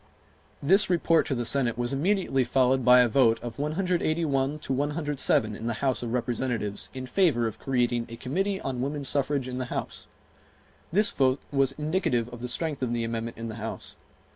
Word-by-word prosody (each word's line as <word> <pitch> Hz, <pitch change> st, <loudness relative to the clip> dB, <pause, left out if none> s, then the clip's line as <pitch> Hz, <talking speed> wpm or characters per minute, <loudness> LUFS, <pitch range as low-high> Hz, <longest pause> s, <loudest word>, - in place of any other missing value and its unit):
This 190 Hz, +8 st, +4 dB
report 165 Hz, -2 st, +2 dB
to 135 Hz, -, -1 dB
the 120 Hz, -1 st, -2 dB
Senate 125 Hz, -2 st, +4 dB
was 120 Hz, +1 st, -2 dB
immediately 165 Hz, -3 st, +1 dB
followed 130 Hz, +1 st, +2 dB
by 125 Hz, +1 st, +7 dB
a 125 Hz, -, +4 dB
vote 115 Hz, -1 st, +3 dB
of 120 Hz, +2 st, -7 dB
181 155 Hz, -3 st, 0 dB
to 140 Hz, -3 st, -4 dB
107 145 Hz, -6 st, 0 dB
in 115 Hz, -, -6 dB
the 120 Hz, -, 0 dB
House 130 Hz, +2 st, 0 dB
of 120 Hz, -2 st, -4 dB
Representatives 120 Hz, -3 st, -2 dB
in 130 Hz, -1 st, -6 dB
favor 135 Hz, -5 st, +2 dB
of 110 Hz, -, -4 dB
creating 120 Hz, -3 st, 0 dB
a 115 Hz, -, -7 dB
Committee 190 Hz, +11 st, -2 dB
on 130 Hz, -2 st, -3 dB
Woman 140 Hz, +2 st, -3 dB
Suffrage 140 Hz, -1 st, 0 dB
in 125 Hz, 0 st, -4 dB
the 130 Hz, -, -2 dB
House. -, -, -5 dB, 0.8 s
This 210 Hz, +6 st, +3 dB
vote 130 Hz, -, +2 dB
was 135 Hz, -1 st, +2 dB
indicative 150 Hz, -6 st, -1 dB
of 120 Hz, -1 st, -10 dB
the 125 Hz, -, -3 dB
strength 150 Hz, +3 st, -1 dB
of 120 Hz, -2 st, -1 dB
the 120 Hz, -1 st, -1 dB
amendment 115 Hz, 0 st, -4 dB
in 115 Hz, 0 st, -5 dB
the 110 Hz, 0 st, -7 dB
House. 115 Hz, -, -6 dB
130 Hz, 190 wpm, -27 LUFS, 120-150 Hz, 0.8 s, by